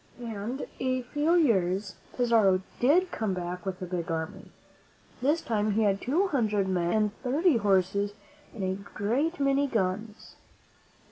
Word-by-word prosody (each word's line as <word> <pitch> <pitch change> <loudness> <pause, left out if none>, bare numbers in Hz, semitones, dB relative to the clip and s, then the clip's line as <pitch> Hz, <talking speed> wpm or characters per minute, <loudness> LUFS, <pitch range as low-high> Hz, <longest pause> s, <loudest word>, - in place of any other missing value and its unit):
And, 230 +3 -4
in 260 - -2
a 255 0 0
few 295 +7 +1
years, 195 - +2 0.2
Pizarro 220 -6 +3 0.2
ditJ 345 +9 +3
come 210 -4 -2
back 180 +1 -5
with 185 -1 -3
a - - -2
big 175 -2 -4
army. 160 -1 -4 0.7
This 295 +6 +2
time 215 -2 0
he 220 +2 +2
had 200 -1 +1
two 320 +11 +1
hundred 210 - +1
men 175 -2 0
and 215 -1 +1
thirty 290 +3 +2
horses 200 0 +1 0.4
and 210 - -6
a 190 +1 -2
great 245 - -1
many 275 0 +2
guns. 215 -1 -3
215 Hz, 150 wpm, -28 LUFS, 190-260 Hz, 0.7 s, Pizarro